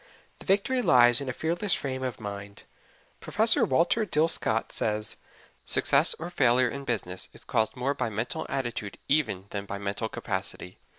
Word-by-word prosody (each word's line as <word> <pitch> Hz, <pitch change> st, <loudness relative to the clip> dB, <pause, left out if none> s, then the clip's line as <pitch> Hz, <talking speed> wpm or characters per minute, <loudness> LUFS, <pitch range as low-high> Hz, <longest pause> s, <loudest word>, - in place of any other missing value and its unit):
The -, -, -15 dB
victory 205 Hz, +7 st, +1 dB
lies 120 Hz, -, +4 dB
in 135 Hz, -, -5 dB
a -, -, -1 dB
fearless 175 Hz, +8 st, -1 dB
frame 130 Hz, -2 st, -5 dB
of 130 Hz, -2 st, -4 dB
mind. 100 Hz, -1 st, -8 dB, 0.6 s
Prof. 225 Hz, +1 st, +6 dB
Walter 170 Hz, -, +2 dB
Dill 160 Hz, -5 st, +1 dB
Scott 115 Hz, -8 st, 0 dB
says: 105 Hz, 0 st, -1 dB, 0.5 s
"Success -, -, +4 dB
or 170 Hz, +2 st, -7 dB
failure 125 Hz, -5 st, +3 dB
in 140 Hz, +2 st, -7 dB
business 95 Hz, -7 st, -3 dB
is -, -, -14 dB
caused 110 Hz, +2 st, -1 dB
more 130 Hz, +2 st, -1 dB
by 140 Hz, -, -3 dB
mental 110 Hz, +3 st, -4 dB
attitude 120 Hz, -6 st, -4 dB
even 135 Hz, -10 st, 0 dB
than 100 Hz, -1 st, -5 dB
by 100 Hz, -, -5 dB
mental 100 Hz, +3 st, -4 dB
capacity." 90 Hz, -, -4 dB
125 Hz, 165 wpm, -27 LUFS, 105-155 Hz, 0.6 s, Prof